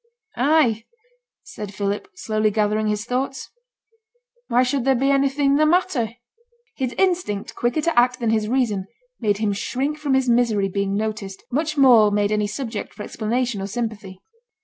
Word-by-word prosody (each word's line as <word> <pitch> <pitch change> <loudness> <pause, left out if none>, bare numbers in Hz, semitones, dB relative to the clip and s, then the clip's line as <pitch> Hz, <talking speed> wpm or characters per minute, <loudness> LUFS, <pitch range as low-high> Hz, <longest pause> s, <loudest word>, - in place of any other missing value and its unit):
'I!' 250 -5 +2 0.6
said 205 -2 -8
Philip, 200 - -2
slowly 215 -8 0
gathering 215 0 0
his 210 0 -1
thoughts. 260 +2 -3 1.0
'Why 245 +2 +3
should 255 0 0
there 270 +1 +3
be 270 +3 +2
anything 275 0 +2
the 310 - +4
matter?' 305 -10 +1 0.6
His 255 -2 -2
instinct, 355 - 0
quicker 240 +6 0
to 330 -4 +3
act 250 +1 +2
than 230 -2 0
his 215 -1 +1
reason, 220 -6 0 0.3
made 205 -2 +1
him 210 -1 0
shrink 270 +9 -2
from 285 -3 +1
his 265 -1 +1
misery 230 -5 +2
being 200 +1 -1
noticed, 210 -2 -4
much 305 +3 -1
more 240 -6 +6
made 205 0 +1
any 210 -1 +1
subject 225 0 -5
for 210 - -7
explanation 235 0 -2
or 195 - -3
sympathy. 210 -4 -5
235 Hz, 160 wpm, -22 LUFS, 210-270 Hz, 1.0 s, more